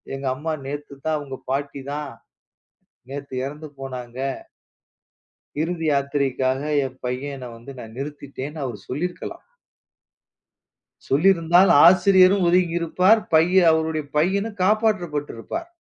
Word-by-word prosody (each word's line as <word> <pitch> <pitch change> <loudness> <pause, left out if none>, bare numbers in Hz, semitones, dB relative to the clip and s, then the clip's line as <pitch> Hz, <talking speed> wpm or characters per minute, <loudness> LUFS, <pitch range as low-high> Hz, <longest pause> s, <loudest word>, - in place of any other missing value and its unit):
எங்க 135 0 -7
அம்மா 160 +3 -3
நேத்துதான், 145 +2 -4
அவுங்க 135 -2 -7
பாட்டிதான் 140 +1 -4 1.0
நேத்து 140 -1 -7
எறந்து 150 +3 -7
போனாங்க. 125 -2 -7 1.4
இறுதி 165 0 -2
யாத்திரைக்காக 140 -2 0 0.2
என் 130 0 -8
பையன 130 0 -4
வந்து 120 +4 -11
நான் 110 -1 -10
நிறுத்திட்டேன்னு 145 +1 -6
அவரு 120 -5 -5
சொல்லி 150 +8 -1
இருக்கலாம். - - -9 1.6
சொல்லி 150 +8 +2
இருந்தால் 175 +2 +4
ஆசிரியரும் 185 +1 +6
ஒதுங்கி 175 -1 +2
இருப்பார். 185 +6 +3
பையன் 170 +2 +5
அவருடைய 160 -1 -1
பையனும் 200 +6 0
காப்பாற்றப்பட்டு 185 -8 +1
இருப்பார். 335 - -6
150 Hz, 105 wpm, -23 LUFS, 135-175 Hz, 1.6 s, ஆசிரியரும்